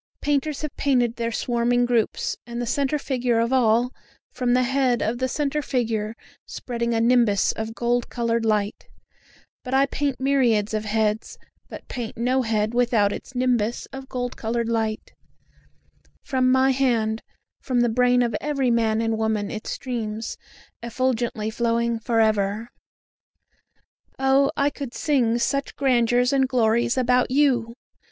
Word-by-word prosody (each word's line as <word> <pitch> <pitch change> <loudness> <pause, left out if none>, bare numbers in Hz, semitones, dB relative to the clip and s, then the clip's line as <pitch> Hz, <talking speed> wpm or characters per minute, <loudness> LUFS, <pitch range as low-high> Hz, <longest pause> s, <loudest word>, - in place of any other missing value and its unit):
Painters 290 +1 -1
have 305 - -4
painted 245 -4 +1
their 230 0 -2
swarming 240 +1 +1
groups, 240 -2 0
and 235 0 -5
the 240 - -2
centre 275 +4 0
figure 250 -4 -1
of 230 +3 0
all, 240 0 +3 0.4
From 245 -2 0
the 255 - +3
head 260 -1 +1
of 235 +2 -1
the 260 - 0
centre 295 +2 -1
figure 225 -5 -2 0.3
spreading 235 -1 -3
a - - +2
nimbus 230 -3 +3
of 220 +1 -5
gold 240 0 0
coloured 235 -1 -1
light; 210 -2 -1 0.8
But 255 +1 -2
I 270 +1 +5
paint 280 -2 -2
myriads 245 -6 +2
of 215 0 -2
heads, 215 0 -1 0.3
but - - -10
paint 240 -3 -6
no 250 +3 +1
head 220 -2 0
without 235 -4 +2
its 265 - -9
nimbus 245 -3 0
of 270 0 -8
gold 245 -1 -3
coloured 230 +1 -2
light; 220 -2 -2 1.1
From 255 -2 +1
my 260 +1 +4
hand, 230 -4 +1 0.4
from 250 -2 0
the 240 - +3
brain 245 +1 +3
of 235 -3 -1
every 275 -4 0
man 225 -1 +1
and 225 -1 -1
woman, 220 -2 -1
it 215 - -6
streams, 225 -3 -4 0.5
effulgently 235 -2 -1
flowing 235 0 0
for 225 0 0
ever. 215 +1 +1 1.5
O 270 +1 +3
I 280 +1 +2
could 275 -4 -7
sing 245 -6 +1
such 275 +4 -1
grandeurs 245 -1 +2
and 265 -1 +3
glories 235 -1 +2
about 250 0 +2
you! 250 -4 +2
240 Hz, 150 wpm, -23 LUFS, 225-260 Hz, 1.5 s, I